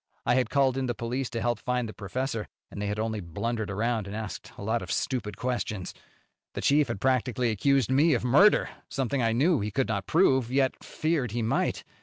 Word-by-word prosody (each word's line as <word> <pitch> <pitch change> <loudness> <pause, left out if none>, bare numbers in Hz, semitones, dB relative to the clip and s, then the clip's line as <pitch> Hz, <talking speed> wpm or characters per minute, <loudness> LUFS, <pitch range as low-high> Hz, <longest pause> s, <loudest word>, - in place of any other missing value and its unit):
I - - +3
had 130 0 +2
called 135 -2 +2
in 130 -1 -1
the 120 - -2
police 120 +3 -3
to 115 - -4
help 120 -2 0
find 125 -1 -1
the 110 - -8
professor, 115 +2 -3 0.2
and 100 - -6
they 105 - -1
had 105 +1 -2
only 110 0 -2
blundered 105 +5 -3
around 110 +1 -1
and 100 - -6
asked 110 -2 -6
a - - -7
lot 110 +3 0
of - - -6
stupid 120 -6 -2
questions. 115 -6 -3 0.6
The - - -3
chief 145 +1 +3
had - - -4
practically 125 -1 +1
accused 130 +4 +2
me 145 +3 +4
of 120 - -2
murder 170 - +5 0.2
something 135 -1 -1
I 115 -1 +2
knew 145 +7 +3
he 105 - -2
could 125 +4 -1
not 100 -3 -2
prove, 130 -8 +3
yet 135 0 +1
feared 155 -8 -1
he 120 -1 -1
might. 110 - 0
120 Hz, 215 wpm, -28 LUFS, 110-135 Hz, 0.6 s, murder